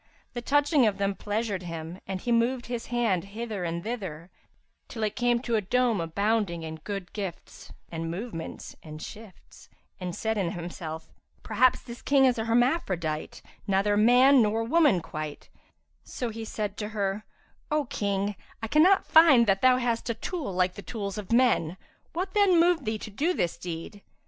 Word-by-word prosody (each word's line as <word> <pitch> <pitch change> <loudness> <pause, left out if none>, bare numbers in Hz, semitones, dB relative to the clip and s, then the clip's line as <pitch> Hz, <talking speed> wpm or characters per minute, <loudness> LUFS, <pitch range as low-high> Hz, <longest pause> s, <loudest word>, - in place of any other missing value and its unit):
The 240 - -4
touching 290 0 +3
of 205 - 0
them 200 0 0
pleasured 205 -1 -2
him 165 0 -7
and 190 -1 -3
he 240 - -3
moved 240 +2 +2
his 240 -1 -5
hand 230 -7 +1
hither 210 -1 -5
and 170 0 -3
thither, 190 -8 -5 0.6
till 225 -3 -5
it 210 0 -1
came 240 0 +2
to 235 -3 0
a - - +1
dome 235 0 +1
abounding 195 0 0
in 160 0 -6
good 195 +1 -6
gifts 195 -5 -7 0.2
and 165 0 -4
movements 175 -1 -6
and 155 -1 -9
shifts, 210 +3 -12 0.3
and 180 -1 -4
said 220 0 -1
in 175 -3 -1
himself, 165 -2 -7 0.3
"Perhaps 255 0 +3
this 240 -1 -9
King 275 -1 +4
is 250 -3 +2
a 220 - -1
hermaphrodite,[FN#348] 225 - 0 0.2
neither 200 +1 +2
man 250 +5 +6
nor 220 +1 +1
woman 275 - +3
quite;" 155 -1 -7 0.5
so 245 - -4
he 225 0 -6
said 210 -2 -4
to 210 -1 -4
her, 205 -1 -2 0.5
"O 300 -1 +1
King, 200 -2 -1 0.2
I 225 - -4
cannot 355 - +5
find 315 -7 +7
that 195 -2 +2
thou 255 -1 +6
hast 240 -2 -1
a 230 - 0
tool 295 - -4
like 180 0 +1
the 200 - -8
tools 200 0 -5
of 205 - -8
men; 230 -9 +3 0.4
what 370 +3 -3
then 400 -4 +5
moved 340 -4 +3
thee 220 0 -1
to 215 - -8
do 320 - 0
this 170 - 0
deed?" 175 +4 -7
215 Hz, 175 wpm, -27 LUFS, 185-245 Hz, 0.6 s, find